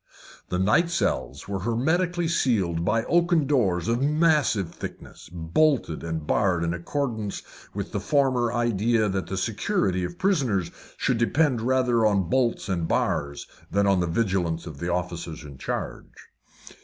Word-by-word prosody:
The 90 - -1
night 105 - +3
cells 170 0 -2
were 100 -1 -3
hermetically 160 - 0
sealed 100 - +1
by 115 +4 +1
oaken 170 0 +2
doors 100 - +1
of 120 +2 +1
massive 150 - +2
thickness, - - -9
bolted 90 - +1
and 80 -2 -4
barred 90 -1 +1
in 85 0 0
accordance 110 +2 -3 0.3
with - - -4
the - - -2
former 130 -5 +1
idea 115 -2 +1
that 95 -1 -2
the 95 - -4
security 100 - 0
of 175 - -5
prisoners 135 - +1 0.3
should 120 - 0
depend 130 0 +2
rather 125 -1 +2
upon 100 -5 +2
bolts 125 -5 +1
and 85 -4 -1
bars 70 -2 -1 0.2
than 100 +1 +2
upon 100 -2 +3
the 85 - 0
vigilance 85 -3 0
of 75 -5 -9
the 85 +1 -2
officers 85 -2 -4
in 70 -3 -11
charge. - - -6
110 Hz, 150 wpm, -25 LUFS, 90-135 Hz, 0.3 s, night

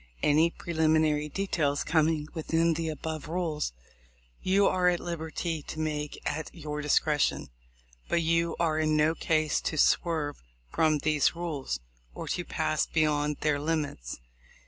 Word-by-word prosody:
Any 155 +3 +4
preliminary 155 -3 +1
details 150 -6 0
coming 155 -1 +2
within 165 0 +1
the 160 0 -2
above 155 0 -5
rules, 160 - -1 0.7
you 195 +2 +3
are 180 -1 +3
at 175 -1 0
liberty 165 -1 -3
to 155 - -7
make 150 -2 -3
at 155 +2 -2
your 150 -2 -4
discretion; 150 - +1 0.6
but 170 - +2
you 165 +1 +1
are 160 -2 +1
in 155 -1 +2
no 155 +1 +3
case 155 -2 +1
to 155 - -2
swerve 155 -1 +2 0.3
from 155 -1 +3
these 150 +1 +2
rules, 145 - -3 0.3
or - - -6
to - - -1
pass - - 0
beyond 150 -2 +1
their 150 -2 +1
limits. 145 - -2
155 Hz, 140 wpm, -29 LUFS, 150-165 Hz, 0.7 s, Any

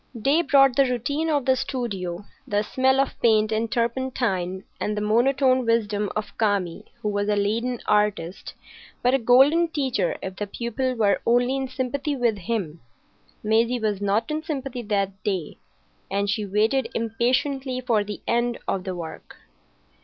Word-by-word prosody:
Day 280 +9 +3
brought 275 -4 +5
the 275 - +6
routine 285 +7 -1
of 290 -4 +1
the 260 - +4
studio, 200 -9 -4 0.2
the 205 0 +1
smell 265 +4 +2
of 275 - +1
paint 215 -2 +3
and 220 0 -1
turpentine, 230 -7 -1 0.2
and 210 0 -2
the - - +1
monotone 255 +4 +3
wisdom 210 -3 0
of 210 -1 -4
Kami, 200 -6 0 0.2
who 210 - 0
was 205 0 -1
a 210 - +2
leaden 225 +4 0
artist, 210 -4 0 0.5
but 250 +1 +3
a 270 - +3
golden 270 +8 +5
teacher 260 - -1
if 190 0 -6
the 205 - -3
pupil 245 +4 -2
were 205 -4 +2
only 245 +2 +2
in 270 -1 -2
sympathy 265 +3 -2
with 235 -5 0
him. 175 -5 -3 0.6
Maisie 225 +3 +2
was 210 -3 -1
not 205 +6 0
in 305 +1 -1
sympathy 270 -5 -4
that 195 -3 -2
day, 185 -7 -3 0.5
and 200 +1 0
she 205 0 -2
waited 220 +6 +1
impatiently 255 +4 0
for 235 -4 +1
the 205 0 -7
end 235 0 +1
of 190 -1 -2
the 185 -1 -3
work. 165 -2 -8
230 Hz, 160 wpm, -24 LUFS, 205-260 Hz, 0.6 s, the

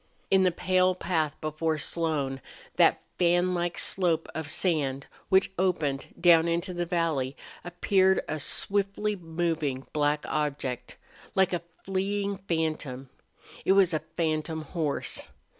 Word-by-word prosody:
In 190 0 +6
the 185 -1 +4
pale 185 +1 +2
path 160 -5 -1
before 155 +1 -1
Slone, 150 -5 0 0.4
that - - +4 0.2
fanlike 175 0 +2
slope 170 -4 +1
of 160 -2 -4
sand 145 -6 0 0.2
which 190 -1 +4
opened 155 -7 0
down 170 -2 +6
into 170 +2 -1
the 175 -1 -2
valley, 160 -6 -1 0.3
appeared 190 +2 +2
a 155 - -3
swiftly 200 +6 0
moving 165 -6 -2
black 150 0 +1
object, 140 -4 -3 0.4
like 190 -1 +3
a 175 - 0 0.2
fleeing 200 +1 -1
phantom. 155 -8 -3 0.5
It 190 - +4
was 190 -3 +4
a 155 - +1 0.2
phantom 160 -1 -1
horse. 155 -2 -2
170 Hz, 125 wpm, -28 LUFS, 155-185 Hz, 0.5 s, In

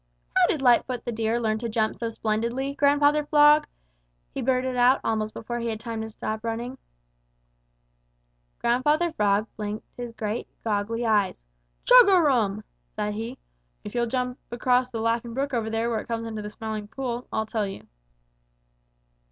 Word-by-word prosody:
"How - - +5
did 285 - -1
Lightfoot 245 -1 +3
the 240 - -2
Deer 225 +1 0
learn 220 -2 0
to 235 0 -3
jump 220 0 0
so 230 - -3
splendidly, 230 +5 -2
Grandfather 290 +1 +3
Frog?" 295 0 +5 0.7
he - - -3
blurted 255 0 0
out 250 +2 +5
almost 215 -1 -1
before 240 +2 -5
he 235 - -3
had 220 -2 -3 0.3
stopped 215 +1 -4
running. 235 +3 -4 1.8
Grandfather 295 +8 +2
Frog 205 -6 +2
blinked 210 0 -4
his 245 -1 -6
great, 220 0 -4 0.2
goggly 225 +2 -1
eyes. 205 - +1 0.4
"Chug - - +8
a 375 -2 +6
rum!" 225 - +2 0.3
said 210 0 -2
he. 225 +5 -5 0.5
"If 210 - -8
you'll 240 -1 0
jump 250 +1 -2
across 250 +1 +1
the 230 -3 -5
Laughing 230 +1 -1
Brook 275 +1 -2
over 225 -2 -1
there 225 +1 -1
where 225 - 0
it - - -9
comes 230 -1 -3
into 220 -1 -5
the 210 - -6
Smiling 215 -1 -5
Pool, 245 +1 -4
I'll 220 - -1
tell 215 -1 -2
you." 195 - -8
235 Hz, 160 wpm, -25 LUFS, 220-255 Hz, 1.8 s, Chug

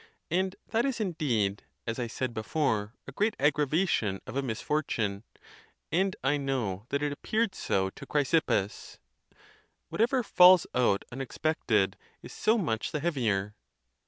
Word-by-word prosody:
And 185 +2 +1
that 225 +1 +1
is 270 -3 -1
indeed, 125 - 0 0.2
as 115 +1 -3
I 120 - -1
said 125 +1 -3
before, 110 -2 -1
a - - -6
great 210 +10 0
aggravation 145 - +1
of - - -8
a 140 - +1
misfortune; 110 -5 -2 0.7
and 190 +3 +1
I 145 +2 +2
know 120 -7 -2
that 140 +1 -1
it 145 - 0
appeared 215 +8 -1
so 95 - 0
to - - -11
Chrysippus—" 140 -8 0 0.9
Whatever 245 +3 +1
falls 180 -3 +7
out 120 -6 +2
unexpected 125 -5 0 0.3
is - - -10
so 220 +2 +2
much 115 - -1
the 155 - -2
heavier." 110 - 0
140 Hz, 135 wpm, -29 LUFS, 110-175 Hz, 0.9 s, falls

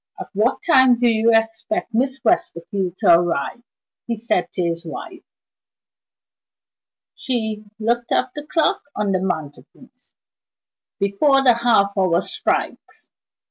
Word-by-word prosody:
"At - - -7
what 215 +6 0
time 260 -7 +5
do 245 - +3
you 225 0 +3
expect 225 +7 -1
Miss 265 +3 0
Westerfield 190 - -1
to - - +5
arrive?" 175 +5 -2 0.5
he 235 -1 -2
said 215 -5 -1
to 180 - -1
his 170 0 -2
wife. 165 - -8 1.9
She 220 -4 -3
looked 235 +2 -1
at 255 - +1
the 295 0 -8
clock 320 +1 +1
on 205 -1 -1
the 185 -1 0
mantelpiece. 180 - -7 0.8
"Before 270 +8 +2
the 250 -2 +6
half 225 -4 +2
hour 185 -3 +2
strikes. - - -4
225 Hz, 125 wpm, -20 LUFS, 190-250 Hz, 1.9 s, the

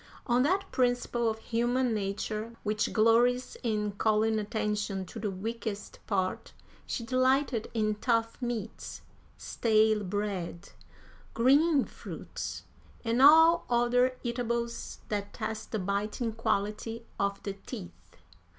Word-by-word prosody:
On 245 -1 +3
that 380 +8 +1
principle 245 -2 +1
of 220 - -3
human 240 +2 0
nature 215 +2 -3
which 210 0 0
glories 235 +3 +3
in 210 -3 0
calling 215 +1 +2
attention 210 -2 -2
to 225 - -9
the 210 -1 -1
weakest 210 +1 -5
part, 190 -3 -1 0.3
she 235 - -3
delighted 255 -1 +2
in 215 -1 +2
tough 230 +1 0
meats, 235 -3 -5 0.3
stale 215 -2 +2
bread, 190 -3 -3 0.7
green 280 +4 +4
fruits, - - -7 0.4
and 230 +2 +2
all 320 +4 +7
other 245 +1 +3
eatables 235 -1 -3
that 205 -1 -3
test 220 -1 -4
the 220 - 0
biting 210 +4 -2
quality 225 +1 -2
of 200 0 -1
the 200 - -3
teeth. 90 - -8
225 Hz, 115 wpm, -30 LUFS, 210-245 Hz, 0.7 s, all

